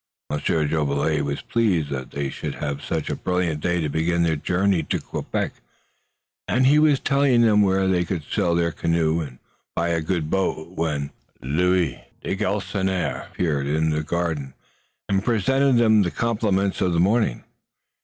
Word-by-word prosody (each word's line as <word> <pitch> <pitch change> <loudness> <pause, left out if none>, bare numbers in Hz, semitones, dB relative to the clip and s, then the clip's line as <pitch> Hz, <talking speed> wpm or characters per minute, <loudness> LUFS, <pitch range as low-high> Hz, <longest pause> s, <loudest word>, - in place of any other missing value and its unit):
Monsieur 75 +1 0
Jolivet 75 0 0
was 70 0 -3
pleased 95 -11 +1
that 65 -2 -4
they 70 -1 -3
should - - -5
have 70 -1 -4
such 80 -2 -2
a - - -1
brilliant 90 -4 -1
day 90 +1 0
to 80 - -1
begin 85 +3 0
their 80 -1 +2
journey 90 +3 +1
to 75 - -2
Quebec, - - -3 0.9
and 130 +1 +2
he 145 +3 +5
was 150 -3 +4
telling 140 -4 +3
them 105 -2 +5
where 95 -1 +2
they 90 -2 +2
could 85 -3 -3
sell 85 +3 0
their 85 0 +1
canoe 80 +1 0
and 65 -5 -7 0.4
buy 85 0 0
a 85 -1 0
good 80 -1 -2
boat 95 -4 -1
when 75 -5 -2 0.3
Louis 90 +6 +1 0.2
de - - -2
Galisonnière 95 -3 -2
appeared 75 -6 -1
in 80 +2 +1
the 75 0 0
garden 80 -4 -3 0.5
and 95 -1 +1
presented 130 +5 +2
them 110 -3 +5
the 90 - +1
compliments 105 -3 0
of 90 -2 +2
the 85 - +1
morning. 100 - +2
85 Hz, 165 wpm, -23 LUFS, 75-100 Hz, 0.9 s, he